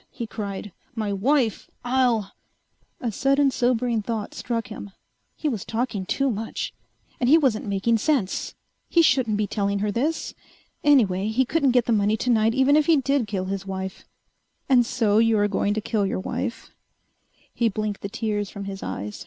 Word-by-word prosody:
he 235 - -6
cried. 205 -2 -6 0.2
"My 215 -3 -1
wife! 235 +2 +1 0.2
I'll 240 -5 +1 0.4
..." - - -43
A - - 0
sudden 275 +4 +2
sobering 245 -2 +1
thought 215 -1 -4
struck 230 -3 -3
him. 200 - -8 0.5
He 310 - -3
was 225 -9 -2
talking 225 -5 -3
too 275 -1 +1
much. 220 +1 -4 0.5
And 245 - +2
he 315 - +8
wasn't 255 -9 +1
making 205 +3 +1
sense. 245 -7 0 0.3
He 335 - +5
shouldn't 255 -7 +3
be 210 - +1
telling 200 0 -1
her 205 +1 -1
this. 290 +10 -1 0.5
Anyway, 210 -10 +4
he 240 +4 +2
couldn't 285 +1 +2
get 240 - +3
the - - 0
money 210 +1 +2
tonight 225 -1 +2
even 265 +2 +4
if 305 -1 +3
he 330 -2 +5
did 275 -3 +1
kill 195 -3 -2
his 195 0 -4
wife. 190 0 -5 0.6
"And 245 -4 +4
so 220 -5 +2
you 225 -1 +4
are 205 0 +3
going 205 0 0
to 215 - -1
kill 210 -2 0
your 190 - -2
wife...." 235 +5 -4 0.8
He 235 -1 +2
blinked 210 0 -3
the 200 - -4
tears 210 -2 -2
from 200 - -7
his 195 -1 -6
eyes. 105 +2 -5
225 Hz, 180 wpm, -24 LUFS, 205-255 Hz, 0.8 s, he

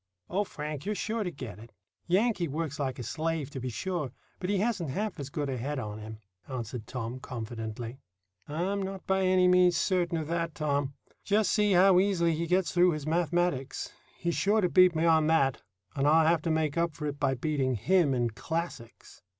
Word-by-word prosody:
"O 195 +4 +2
Frank, 150 -6 -6
you're 210 +1 -2
sure 220 +3 -2
to 180 - -2
get 140 - -8
it. 115 +1 -13 0.4
Yankee 190 0 +2
works 150 0 -3
like 135 -3 -2
a 125 - -5
slave, 155 +3 -2
to 135 - -5
be 130 0 -3
sure, 155 +1 -3 0.3
but 185 - -3
he 200 - +2
hasn't 200 - 0
half 200 +7 -3
as 140 -1 -5
good 145 0 -3
a 130 -2 -2
head 140 +5 -3
on 105 -4 -5
him," 110 0 -8 0.3
answered 120 -3 -5
Tom 125 0 -5
confidently. 115 0 -6 0.5
"I'm 185 +7 -1
not 195 0 -5
by 190 0 +1
any 185 -1 +4
means 180 -1 +5
certain 175 -3 +1
of 160 - -2
that, 170 -1 -2
Tom. 145 -2 -1 0.3
Just 205 0 +2
see 210 -2 +3
how 185 0 +6
easily 180 -4 +2
he 165 +2 -2
gets 180 -2 +2
through 180 0 +4
his 150 -2 -5
mathematics. 170 -4 0 0.2
He's 170 -1 -1
sure 210 +5 +2
to 180 - +2
beat 185 -1 +6
me 160 +1 +1
on 160 -2 +4
that, 140 -5 +2 0.3
and 140 0 +1
I'll 160 +1 +5
have 165 0 +3
to 165 - -2
make 160 0 +1
up 170 -2 0
for 150 - -5
it 145 -1 -3
by 135 -2 +1
beating 135 -1 0
him 160 - +3
in 120 -2 0
classics. 160 -3 -6
160 Hz, 205 wpm, -29 LUFS, 135-180 Hz, 0.5 s, how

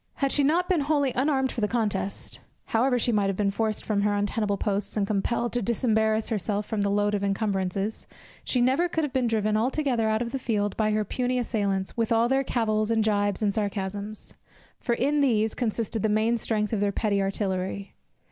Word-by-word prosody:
Had 275 -1 0
she 290 - +3
not 335 +6 +2
been 365 -3 +2
wholly 285 -2 +1
unarmed 265 0 +1
for 235 - -4
the 210 - +2
contest, 205 -4 -2 0.3
however 250 +3 +2
she 240 0 +2
might 205 -3 +2
have 195 - -1
been 200 -1 +1
forced 215 +1 -1
from 205 -2 0
her 205 0 +1
untenable 205 0 0
posts, 200 +1 -2
and 205 - +2
compelled 225 +4 -1
to 245 - 0
disembarrass 220 -1 +1
herself 210 -1 -1
from 215 -1 -2
her 200 - +1
load 205 +1 +1
of 205 - 0
incumbrances, 195 0 -1 0.4
she 250 - 0
never 270 +8 +2
could 320 -1 -1
have 295 - -3
been 255 -2 +1
driven 215 -2 +1
altogether 245 -1 +1
out 220 +2 +1
of 235 - -5
the 270 - -3
field 205 -5 -1
by 215 -1 +1
her 215 0 0
puny 250 +4 -1
assailants, 200 -5 -1
with 230 -1 -1
all 230 +1 +4
their 270 +2 +2
cavils, 215 -4 0
and 225 -1 +2
gibes, 205 -1 +1
and 205 -1 +2
sarcasms; 205 0 -3 0.5
for 235 - 0
in 290 +4 +1
these 220 -5 +2
consisted 225 -1 -2
the 220 - +1
main 215 +3 +2
strength 215 -1 -1
of 215 - +1
their 205 0 +1
petty 200 -1 0
artillery. 195 0 -2
215 Hz, 205 wpm, -26 LUFS, 205-240 Hz, 0.5 s, all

